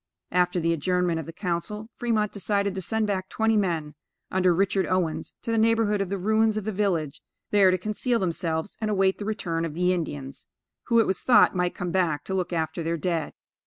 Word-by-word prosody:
After 180 0 +2
the 165 0 +1
adjournment 175 +1 0
of 160 - -6
the - - -6
council, 195 +6 -4
Fremont 220 -3 0
decided 200 -1 -1
to 190 - -4
send 220 +5 0
back 190 -2 -2
twenty 220 0 +1
men, 165 -7 0 0.4
under 185 -1 +3
Richard 190 +2 +1
Owens, 180 -4 -1
to 230 - -2
the 225 - +2
neighborhood 220 -2 +2
of 195 - -2
the 200 - -1
ruins 220 +3 +2
of 215 - -2
the 215 - -2
village, 180 -8 -1 0.3
there 200 -2 +6
to 185 - +2
conceal 215 +6 0
themselves 165 -2 -2
and 215 - 0
await 195 -2 +2
the 205 - -4
return 175 -6 -2
of 160 -2 -4
the 180 +1 +2
Indians; 145 -6 -5 0.4
who, 235 -1 +4
it 225 - +4
was 190 - -1
thought, 215 -6 +5
might 180 -1 0
come 180 -1 -3
back 165 -5 +1
to 190 - -5
look 185 -2 -1
after 165 0 -2
their 165 +1 -1
dead. 165 0 -2
185 Hz, 210 wpm, -26 LUFS, 170-210 Hz, 0.4 s, there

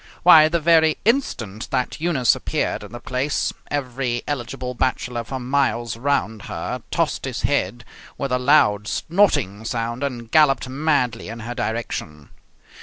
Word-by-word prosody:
Why, 160 -3 +8
the 170 +1 +1
very 160 -1 +4
instant 115 - -1
that 130 +3 -2
Eunice 150 -8 +3
appeared - - -2
in - - -11
the 120 - -7
place, 130 +4 -1 0.2
every 130 -3 -2
eligible 125 -2 -4
bachelor 125 -1 -1
for 130 +4 -5
miles 125 -3 0
around 115 -4 -1
her - - -4
tossed - - -1
his - - -4
head 115 +6 0 0.3
with 140 -2 -3
a 125 - +2
loud, 105 -7 +3
snorting 135 - +1
sound, 115 +1 -3
and 120 -5 -4
galloped 140 -5 +4
madly 130 -4 0
in 115 0 -7
her 120 +2 -5
direction. 110 - -4
125 Hz, 145 wpm, -22 LUFS, 115-145 Hz, 0.3 s, Why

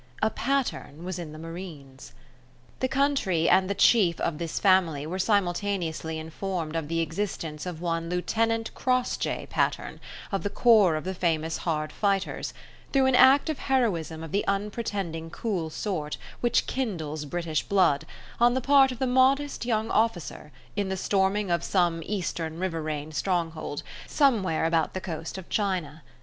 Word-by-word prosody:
A 220 - +3
Patterne 245 - -2
was 185 0 -4
in 165 -3 -6
the 155 - -9
Marines. 160 -6 -9 0.7
The 260 - +1
country 265 - +1
and 185 +1 +4
the 200 - 0
chief 195 -5 +4
of 160 -2 -1
this 165 -2 -3
family 175 -7 +3
were 180 +4 -4
simultaneously 180 -5 0
informed 160 0 -4
of 165 -2 -2
the 165 +1 0
existence 165 -2 -3
of 170 -2 -6
one 165 -1 -2
Lieutenant 225 +5 0
Crossjay 255 -1 0
Patterne, - - -1 0.3
of 195 - -1
the 205 - -2
corps 210 -8 +5
of 155 - -3
the 190 - -3
famous 165 -3 0
hard 155 -2 -2
fighters, 195 -2 -1 0.4
through 270 -1 +4
an 265 -1 +4
act 265 +4 +6
of 310 -3 -2
heroism 175 - 0
of 165 - -7
the 200 - +1
unpretending 195 -5 -2
cool 180 -4 -2
sort 155 -4 -3 0.2
which 240 - +2
kindles 160 - -3
British 160 0 -1
blood, 185 -8 +2 0.3
on 240 +1 +5
the - - +2
part 270 0 +5
of 250 - -6
the 265 - 0
modest 260 +1 +2
young 220 -1 0
officer, 185 -8 -1 0.2
in 200 -2 -1
the 190 - -2
storming 195 0 +1
of 170 -1 +1
some 175 -3 +1
eastern 170 -5 -3
riverain 155 -4 -3
stronghold, 165 -4 -2 0.2
somewhere 215 - +2
about 165 0 +1
the - - -1
coast 165 0 -5
of 190 - -8
China. 180 -7 -1
185 Hz, 160 wpm, -27 LUFS, 160-215 Hz, 0.7 s, act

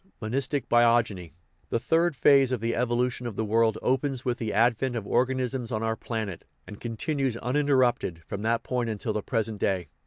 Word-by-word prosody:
MONISTIC 130 +4 -1
BIOGENY 115 -7 +2 0.4
The 115 - 0
third 165 +4 +1
phase 135 -1 +5
of 130 - 0
the 115 +2 -1
evolution 125 0 0
of 115 - -6
the 110 - -1
world 110 +1 +2
opens 130 0 0
with 125 -1 -1
the 110 -2 -2
advent 120 +3 +2
of 110 -4 -3
organisms 125 +1 0
on 110 -1 -2
our 115 0 0
planet, 110 -5 -5 0.2
and 105 - -11
con 115 -1 -5
tinues 135 -4 -1
uninterrupted 125 - +1
from 100 - -5
that 115 +1 0
point 125 -2 -1
until 110 0 -3
the 105 - -1
present 110 -2 -2
day. 90 -5 -1
120 Hz, 185 wpm, -27 LUFS, 110-130 Hz, 0.4 s, phase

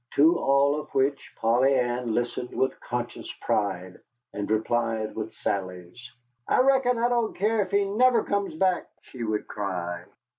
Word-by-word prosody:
To 160 +4 +5
all 140 +2 +3
of 150 - -9
which 135 +1 0
Polly 125 +4 +3
Ann 120 -2 0
listened 120 +1 -2
with 130 - -1
conscious 120 0 -5
pride, 95 -3 -2 0.3
and 100 0 -4
replied 110 0 0
with 110 0 -4
sallies. 95 +5 -5 0.4
"I - - +3
reckon 260 -2 +3
I 235 +1 +2
don't 240 -2 0
care 215 +3 +2
if 195 - -3
he 200 0 +2
never 230 +4 +3
comes 200 -4 -2
back," 185 +1 +1 0.2
she 125 -3 -8
would 110 -1 -2
cry. 90 -4 -4
125 Hz, 155 wpm, -26 LUFS, -, 0.4 s, To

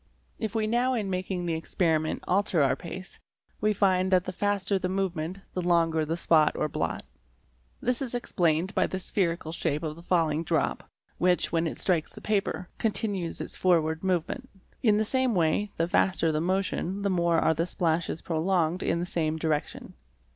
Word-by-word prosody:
If 220 -1 -3
we 220 -1 +1
now 245 +4 +1
in 205 -5 -2
waking 185 -1 -2
the 170 - 0
experiment 160 -1 0
alter 185 -4 +2
our 135 - +3
pace, 180 +2 -9 0.4
we 215 +1 +2
find 190 -2 +2
that 185 -1 +4
the 185 - -4
faster 200 0 0
the 185 - -2
move 190 -1 -1
ment 160 +4 -4 0.2
the 180 - -1
longer 165 -2 +2
the 165 +2 -2
spot 160 -3 +3
or - - 0
blot. - - -2 0.8
This 250 +1 0
is 250 -2 -2
explained 175 -6 0
by - - +2
the 190 - -3
spherical 170 -4 -1
shape 160 -2 -1
of 155 -1 -3
the 170 - -12
falling 165 -3 +1
drop - - -1 0.3
which, 180 0 +2
when 165 0 +1
it - - -5
strikes 170 -5 0
the - - -10
paper, 200 -3 -1
continues 200 -5 -1
its - - -7
forward 160 -2 +2
movement. 190 - -1 0.3
In 215 -3 +4
the 215 - +1
same 260 0 +1
way, 175 +4 +2
the 165 - +1
faster 170 -2 +2
the 155 0 0
motion 190 +1 -1
the 200 - +1
more. 170 -2 +2
are 160 - +3
the 165 +2 -1
splashes 165 -2 -1
prolonged 170 +1 0
in 170 - 0
the 175 - -1
same 160 -3 -1
direction. 155 -2 -2
180 Hz, 185 wpm, -28 LUFS, 165-195 Hz, 0.8 s, that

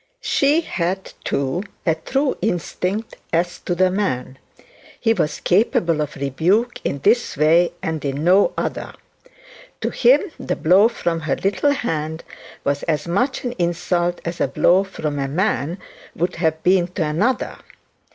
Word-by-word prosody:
She 295 - +2
had, 190 - -3
too, 140 +5 -1 0.2
a 165 - +4
true 265 - -1
instinct 195 +2 -2
as 175 +2 0
to 175 - -2
the 185 +1 +3
man; 130 -10 -2 0.6
he 225 -2 +3
was 150 - -1
capable 175 -5 +2
of 150 - -4
rebuke 170 - 0
in 140 - -1
this 235 - +2
way 165 +4 +4
and 160 -2 -2
in 140 +1 -2
no 185 +4 +5
other. - - -3 0.9
To - - -1
him 260 +4 +4 0.2
the - - -2
blow 185 +7 +5
from 170 -8 -2
her 155 -3 -1
little 205 +9 +1
hand 160 - -3 0.4
was 140 0 0
as 155 0 0
much 245 +10 0
an 245 - -2
insult 175 0 0
as 170 +1 -4
a - - +3
blow 180 +7 +3
from 155 -7 -4
a 135 - -1
man 170 0 -1 0.4
would 175 +1 -1
have 160 -1 0
been 180 -1 +4
to 175 -5 0
another. 190 +13 0
175 Hz, 150 wpm, -21 LUFS, 155-200 Hz, 0.9 s, no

